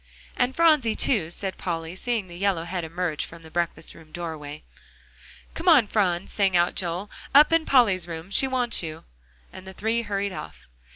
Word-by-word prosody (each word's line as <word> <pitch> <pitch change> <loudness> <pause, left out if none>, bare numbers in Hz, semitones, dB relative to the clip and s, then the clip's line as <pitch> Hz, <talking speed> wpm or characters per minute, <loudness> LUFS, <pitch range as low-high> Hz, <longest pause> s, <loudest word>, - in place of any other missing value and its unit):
"And 250 +1 0
Phronsie, 305 -10 +4
too," 195 -11 0
said 190 +2 -4
Polly, 165 -1 -4
seeing 225 -1 -2
the 175 - -11
yellow 190 -2 0
head 175 0 -4
emerge 165 -1 -2
from 165 0 -10
the 160 - -13
breakfast 170 0 -3
room 160 -1 -16
doorway. 155 -3 -7 0.9
"Come 345 +2 0
on, 285 -9 +7
Phron," 190 -4 0
sang 195 -3 +1
out 175 +1 +2
Joel, 180 +3 -3 0.2
"up 300 +3 +7
in 330 -1 +2
Polly's 205 -10 +4
room 165 +2 -7
she 270 - +3
wants 250 -2 +1
you," 155 -2 -7 0.5
and 190 - -11
the 190 - -8
three 220 +4 -1
hurried 200 -2 -2
off. 80 - -9
185 Hz, 180 wpm, -25 LUFS, 170-230 Hz, 0.9 s, on